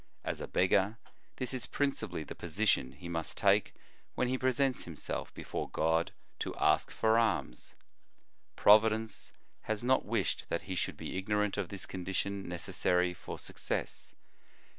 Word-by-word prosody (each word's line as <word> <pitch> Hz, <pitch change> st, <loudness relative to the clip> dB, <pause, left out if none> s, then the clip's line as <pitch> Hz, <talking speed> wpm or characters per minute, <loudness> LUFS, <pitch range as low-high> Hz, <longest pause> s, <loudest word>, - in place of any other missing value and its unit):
As -, -, -3 dB
a -, -, -4 dB
beggar, 95 Hz, +4 st, +3 dB, 0.4 s
this 130 Hz, -1 st, -3 dB
is 130 Hz, -, -3 dB
principally 110 Hz, -, -1 dB
the -, -, -7 dB
position 90 Hz, -5 st, +1 dB
he 90 Hz, -, -9 dB
must 85 Hz, -2 st, -4 dB
take -, -, +3 dB, 0.4 s
when 125 Hz, -, +1 dB
he 130 Hz, -, +1 dB
presents 130 Hz, +1 st, +1 dB
himself 85 Hz, -3 st, -4 dB
before -, -, -4 dB
God 80 Hz, +1 st, +1 dB, 0.3 s
to -, -, -3 dB
ask -, -, +3 dB
for 110 Hz, 0 st, +3 dB
alms. 105 Hz, -, -1 dB, 0.8 s
Providence 110 Hz, +1 st, +4 dB, 0.3 s
has 110 Hz, 0 st, -2 dB
not 130 Hz, +2 st, +3 dB
wished -, -, -1 dB
that 85 Hz, -, -1 dB
he 95 Hz, -, -4 dB
should 90 Hz, -, -2 dB
be 95 Hz, -, -3 dB
ignorant 105 Hz, +1 st, +1 dB
of 100 Hz, -4 st, -2 dB
this 100 Hz, -2 st, -6 dB
condition 95 Hz, +1 st, -3 dB
necessary 90 Hz, 0 st, +1 dB
for 90 Hz, -, -7 dB
success. -, -, -4 dB
100 Hz, 145 wpm, -32 LUFS, 90-110 Hz, 0.8 s, Providence